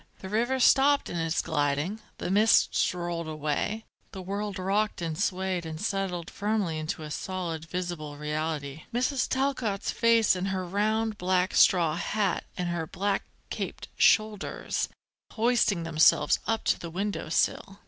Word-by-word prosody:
The 190 - -8
river 240 +5 +1
stopped 280 +3 +4
in 175 - -3
its 165 0 0
gliding; 150 +6 -1 0.2
the - - -3
mists 215 +3 +4
rolled 175 -2 -4
away; 155 +8 -2 0.3
the 190 - -6
world 200 +1 -3
rocked 200 +3 0
and 165 -2 -3
swayed 185 -1 -1
and 160 -1 -6
settled 195 -4 -2
firmly 205 -6 -1
into 155 0 -4
a 150 - -7
solid, 170 -3 -4
visible 165 -4 -5
reality; 150 -1 -3
Mrs. 255 +2 0
Talcott's 255 -7 -1
face 230 -3 +4
and 185 +1 -2
her 190 -1 -2
round 215 +3 0
black 185 0 +1
straw 170 -4 +4
hat 210 +3 -1
and 180 -1 -1
her 170 -2 -2
black 195 +4 -1 0.3
caped - - -5
shoulders, 215 -2 +1 0.4
hoisting 220 -6 +2
themselves 165 -1 +4
up 225 +1 0
to - - +1
the 170 - -6
window 195 0 -3
sill. 195 +4 0
185 Hz, 150 wpm, -28 LUFS, 165-210 Hz, 0.4 s, stopped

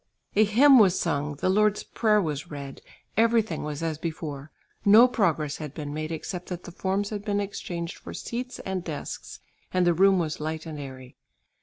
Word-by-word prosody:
A 215 - +6
hymn 260 +6 +7
was 190 -4 +5
sung, 150 -3 -1
the 140 - -2
Lord's 210 +1 +3
Prayer 215 -2 +2
was 150 -6 -3
read; 140 -2 -8 0.3
everything 225 -6 +2
was 150 +1 -4
as 160 -2 -2
before; 155 -3 -5 0.3
no 220 +5 +8
progress 160 - 0
had 150 -3 -7
been 145 -2 -5
made 155 +1 -4
except 175 +3 -5
that 180 -1 -5
the - - -9
forms 195 +4 -1
had 205 -1 -4
been 205 -1 0
exchanged 175 -3 -4
for - - -9
seats 250 +1 -5
and 190 -2 -2
desks, 155 -4 -6 0.3
and 185 -1 +2
the 175 - +4
room 190 +3 +5
was 160 -3 -2
light 155 +1 -4
and 155 -2 -6
airy. 130 -2 -9
175 Hz, 185 wpm, -26 LUFS, 150-205 Hz, 0.3 s, no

